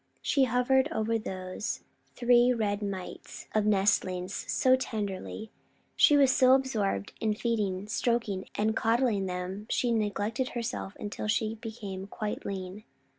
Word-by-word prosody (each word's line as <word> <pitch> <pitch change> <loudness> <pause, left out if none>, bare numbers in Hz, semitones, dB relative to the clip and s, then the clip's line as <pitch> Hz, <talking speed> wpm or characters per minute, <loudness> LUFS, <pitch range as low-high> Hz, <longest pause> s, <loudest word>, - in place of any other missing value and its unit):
She 275 -2 +3
hovered 260 +4 +2
over 225 -5 0
those 185 0 -5 0.3
three 245 0 +5
red 210 -4 0
mites 195 -3 -6
of 215 -1 +2
nestlings 190 -2 +1 0.2
so 255 0 +4
tenderly! 215 -3 -4 0.4
She 295 - +6
was 275 -2 +5
so 255 0 +6
absorbed 215 - -1
in 215 -1 +1
feeding, 210 -4 -1
stroking, 225 -4 -1
and 220 +1 +1
coddling 225 -4 +2
them 185 +3 -5
she 245 - +1
neglected 220 +3 -1
herself 235 -4 -4
until 210 +1 -4
she 215 +1 +1
became 215 -4 -7
quite 210 +1 -4
lean. 190 +1 -5
215 Hz, 130 wpm, -29 LUFS, 195-240 Hz, 0.4 s, She